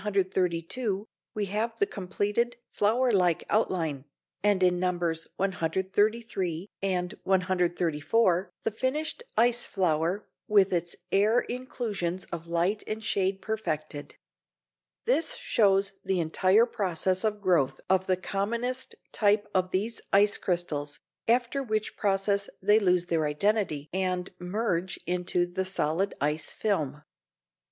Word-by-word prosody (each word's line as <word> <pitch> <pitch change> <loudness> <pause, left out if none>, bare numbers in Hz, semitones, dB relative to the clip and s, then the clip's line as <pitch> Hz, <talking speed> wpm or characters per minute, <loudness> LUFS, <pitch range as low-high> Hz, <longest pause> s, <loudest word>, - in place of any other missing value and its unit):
132, 190 +1 -1 0.3
we 210 -1 0
have 215 +4 -2
the 405 - +3
completed 205 - -1 0.2
flower 240 +5 +2
like 180 -5 +2
outline, 165 -10 0 0.4
and 205 -2 +3
in 180 -1 +3
Nos. 175 -3 0
133 190 0 0
and 185 -1 -1
134 180 0 +1
the - - 0
finished 265 - -2 0.2
ice 240 +1 +3
flower 175 +1 0 0.2
with 200 -2 +4
its 175 0 -1 0.2
air 215 +5 +4
inclusions 210 -8 -3
of 170 -1 -5
light 175 +5 0
and 220 +1 -4
shade 195 -2 0
perfected. 155 -9 -4 0.9
This 275 +7 +4
shows 200 - +2
the 190 -2 0
entire 185 +7 +4
process 185 -4 -1
of 210 -1 0
growth 175 -9 +2
of 190 0 +2
the 185 -1 +2
commonest 235 +7 -2 0.2
type 210 0 +2
of 185 -1 +1
these 215 +5 -2
ice 205 +1 +4
crystals, 155 -5 -2 0.3
after 245 +3 +2
which 215 -4 -2
process 200 0 +1
they 210 +3 +5
lose 180 -3 +2
their 165 -3 +1
identity 155 -2 0
and 185 -1 -1
merge 180 -1 -1
into 180 0 +1
the 175 +2 -3
solid 185 +1 0
ice 150 +2 -1
film. 150 -9 -1
190 Hz, 120 wpm, -28 LUFS, 175-215 Hz, 0.9 s, they